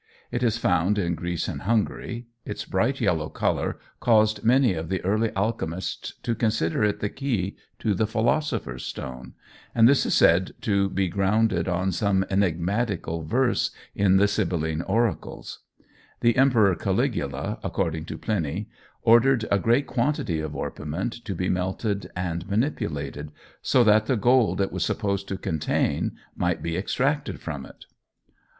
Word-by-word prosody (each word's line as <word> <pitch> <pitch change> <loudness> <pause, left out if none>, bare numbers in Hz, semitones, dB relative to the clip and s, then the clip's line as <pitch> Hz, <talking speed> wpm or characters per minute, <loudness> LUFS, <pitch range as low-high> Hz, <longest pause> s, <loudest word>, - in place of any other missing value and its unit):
It 120 - -2
is 115 -2 +2
found 95 -1 +2
in 85 -4 0
Greece 85 0 -3
and - - -4
Hungary. 115 +2 -1 0.2
Its - - -5
bright - - 0
yellow - - +1
colour - - -1 0.2
caused 110 -2 +3
many 125 -1 +4
of 80 -1 -5
the 95 - 0
early 110 +4 +2
alchemists 95 -4 -3
to 120 - 0
consider 110 -5 0
it 105 -1 +1
the 105 - 0
key 115 -9 -2 0.2
to 110 - 0
the 105 +3 +1
Philosopher's 110 - -1
Stone, 65 -1 -7 0.4
and 115 -1 +7
this 140 +1 +4
is - - +1
said 90 +3 +4
to 100 -2 +1
be 95 0 0
grounded 95 0 +1
on 90 +1 0
some 95 -1 +1
enigmatical 95 -1 0
verse 120 +10 +1 0.2
in 95 -1 +4
the 100 +1 +5
Sibylline 85 -6 -1
oracles. 115 -4 -2 0.6
The 120 -1 +4
Emperor 120 -7 +4
Caligula, 100 - -1
according 80 -4 -2
to - - -6
Pliny, 100 0 -2 0.3
ordered 120 +1 +5
a 100 - +4
great 120 +8 +2
quantity 120 - -1
of 80 -1 -4
orpiment 85 +10 -3
to 100 - -3
be 90 +2 -1
melted 95 +3 -1
and 90 0 -3
manipulated, 75 - -2 0.3
so 125 - +4
that 110 0 +4
the 130 - +2
gold 120 -1 +3
it 95 - 0
was - - -1
supposed 100 -1 -1
to 95 - -3
contain 80 -5 -1 0.2
might 90 -2 -1
be 85 0 -2
extracted 135 - -1
from 70 -5 -6
it. - - -15
100 Hz, 150 wpm, -25 LUFS, 85-115 Hz, 0.6 s, and